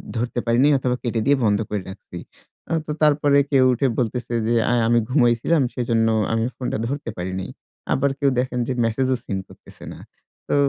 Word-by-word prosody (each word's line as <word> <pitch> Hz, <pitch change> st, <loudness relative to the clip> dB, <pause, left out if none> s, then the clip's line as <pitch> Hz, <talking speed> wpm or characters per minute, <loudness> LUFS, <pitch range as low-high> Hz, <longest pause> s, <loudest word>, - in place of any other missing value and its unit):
ধরতে 120 Hz, +1 st, -2 dB
পারিনি 120 Hz, +4 st, +3 dB
অথবা 125 Hz, -1 st, -1 dB
কেটে 115 Hz, -2 st, -1 dB
দিয়ে 140 Hz, +1 st, +4 dB
বন্ধ 105 Hz, -1 st, +2 dB
করে 105 Hz, -2 st, -2 dB
রাখছি। 95 Hz, -2 st, -10 dB, 0.7 s
তো 150 Hz, -, -4 dB
তারপরে 145 Hz, -1 st, +4 dB
কেউ 135 Hz, -2 st, +5 dB
উঠে 135 Hz, +3 st, +1 dB
বলতেছে 120 Hz, 0 st, -2 dB
যে, 120 Hz, -, +2 dB
অ্যা 120 Hz, -, +2 dB
আমি 120 Hz, 0 st, +4 dB
ঘুমাইছিলাম, 125 Hz, +4 st, +2 dB
সেজন্য 115 Hz, -2 st, +1 dB, 0.3 s
আমি 115 Hz, 0 st, +1 dB
ফোনটা 125 Hz, -, -3 dB
ধরতে 140 Hz, -1 st, -4 dB
পারি 90 Hz, +1 st, -4 dB
নাই। 95 Hz, -, -6 dB, 0.4 s
আবার 140 Hz, +1 st, +1 dB
কেউ 140 Hz, -, +3 dB
দেখেন 125 Hz, 0 st, -2 dB
যে, 130 Hz, -, -1 dB
মেসেজও 130 Hz, +3 st, 0 dB
সিন 95 Hz, -, -3 dB
করতেছে -, -, -16 dB
না। -, -, -12 dB, 0.5 s
তো -, -, 0 dB
125 Hz, 180 wpm, -22 LUFS, 115-135 Hz, 0.7 s, কেউ